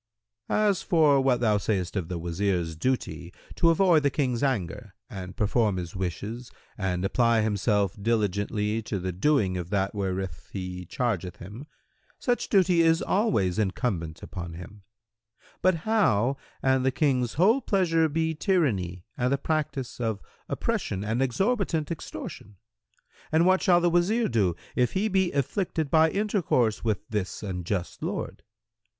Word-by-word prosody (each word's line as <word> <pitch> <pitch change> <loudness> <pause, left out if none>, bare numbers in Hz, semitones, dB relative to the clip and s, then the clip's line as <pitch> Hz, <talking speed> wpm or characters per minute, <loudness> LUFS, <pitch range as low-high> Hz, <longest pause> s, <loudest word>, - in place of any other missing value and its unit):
Q - - +1
"As 210 -3 +2
for 155 -6 +4
what 130 -2 +2
thou 105 -3 +3
sayest 95 -3 -1
of 95 -5 -2
the 90 - -4
Wazir's 85 0 -1
duty 85 -5 -2 0.2
to 170 - +3
avoid 165 -1 +4
the 145 - +2
King's 130 -4 -1
anger 105 - -2 0.2
and 95 -2 -7
perform 105 -1 +1
his 85 -1 -5
wishes 105 +6 -4 0.2
and 95 -2 -2
apply 115 +2 +3
himself 105 -2 +1
diligently 105 0 0
to 105 -1 -4
the 95 0 -3
doing 95 - +1
of 90 -1 -5
that 100 -1 0
wherewith 95 -2 -2 0.2
he 90 -1 -5
chargeth 95 -8 -2
him, 110 - -10 0.5
such 245 -1 -1
duty 180 -4 +4
is 165 0 +3
always 110 - +1
incumbent 95 -5 -2
on 85 -2 -5
him; 90 +4 -11 0.8
but 185 -1 +4
how, 140 - +2 0.3
an 130 0 +3
the 130 - +2
King's 130 -3 0
whole 215 - +4
pleasure 165 -7 +2
be 160 +2 0
tyranny 115 - 0
and 125 +1 0
the 140 - +2
practice 145 -4 -2
of 110 -4 -1 0.3
oppression 95 - -2
and 110 +4 -1
exorbitant 170 - 0
extortion; 105 - -7 0.8
and 160 +2 +4
what 185 +1 +4
shall 175 -2 +5
the 175 0 +2
Wazir 200 +7 +2
do, 100 -7 +1 0.2
if 125 -1 +1
he 195 +3 +1
be 190 -3 +1
afflicted 155 - -1
by 160 0 +5
intercourse 180 - 0
with 105 -3 -1
this 105 -2 -3
unjust 90 -1 -3
lord? - - -4
115 Hz, 150 wpm, -27 LUFS, 95-160 Hz, 0.8 s, shall